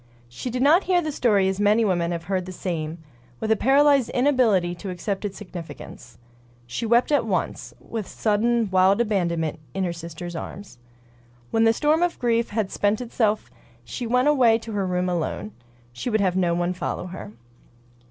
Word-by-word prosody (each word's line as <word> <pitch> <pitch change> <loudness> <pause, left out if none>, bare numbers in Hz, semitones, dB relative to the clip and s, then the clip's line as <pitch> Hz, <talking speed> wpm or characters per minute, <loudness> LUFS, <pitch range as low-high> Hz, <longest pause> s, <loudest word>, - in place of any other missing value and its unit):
She 120 - -6
did 250 +2 -1
not 325 +7 +5
hear 365 -1 +3
the 310 -3 -2
story 210 -8 +2
as 190 +1 -1
many 210 +2 +3
women 175 -3 0
have 170 -1 -3
heard 185 0 -2
the - - -6
same, 165 -3 -4 0.4
with 220 - -1
a - - +6
paralyzed 275 +1 +4
inability 245 -10 +2
to 190 +3 -7
accept 195 +3 -3
its 200 -1 -5
significance. 170 - -10 0.5
She 120 - -4
wept 240 +5 +3
at 290 -4 +3
once, 185 -4 -2
with 220 -5 -6
sudden, 225 +2 +1
wild 190 +2 +4
abandonment, 170 -9 0 0.2
in 195 - 0
her 175 -2 -1
sister's 170 +1 -7
arms. 175 -5 -8 0.7
When 225 0 +3
the 225 - +6
storm 300 +7 +2
of 350 -1 +1
grief 235 -1 +1
had 210 -2 -2
spent 205 +1 +1
itself 225 -3 -1 0.3
she 245 - -5
went 250 +4 +2
away 250 -6 +5
to 225 0 -9
her 200 -3 -1
room 180 0 0
alone. 160 -12 -2 0.4
She 125 - -4
would 220 -2 +1
have 185 -3 +1
no 175 -2 +2
one 175 +1 0
follow 180 0 -4
her. 175 - -8
205 Hz, 180 wpm, -24 LUFS, 180-235 Hz, 0.7 s, a